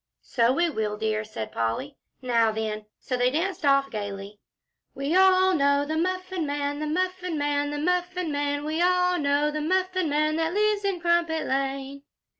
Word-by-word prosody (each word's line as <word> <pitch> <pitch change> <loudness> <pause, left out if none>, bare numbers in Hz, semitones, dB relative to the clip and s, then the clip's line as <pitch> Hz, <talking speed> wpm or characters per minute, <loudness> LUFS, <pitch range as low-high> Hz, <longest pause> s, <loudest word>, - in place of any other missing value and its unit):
"So 235 -1 +2
we 340 +6 +2
will, 215 -8 -2
dear," 215 0 -1
said 210 - -7
Polly. 115 - -2 0.3
"Now 230 -3 +2
then!" 215 -1 -4
So 255 - -3
they 250 0 +2
danced 345 +6 -2
off 275 -1 +3
gayly. 205 -1 -6 0.6
"We 280 +5 -1
all 375 0 +5
know 280 -2 +2
the 310 +2 -3
Muffin 370 0 -2
Man 285 0 -2
the 305 - -3
Muffin 365 +1 -2
Man 290 0 0
the 295 - -4
Muffin 360 +1 -1
Man. 285 0 -1
We 315 +2 -1
all 360 0 +3
know 290 +1 +1
the 305 0 -3
Muffin 370 +1 0
Man, 305 +2 +1
that 325 +2 -1
lives 420 -1 +2
in 395 -3 -1
Crumpet 340 -2 +1
Lane." 275 +1 -2
295 Hz, 175 wpm, -26 LUFS, 270-360 Hz, 0.6 s, all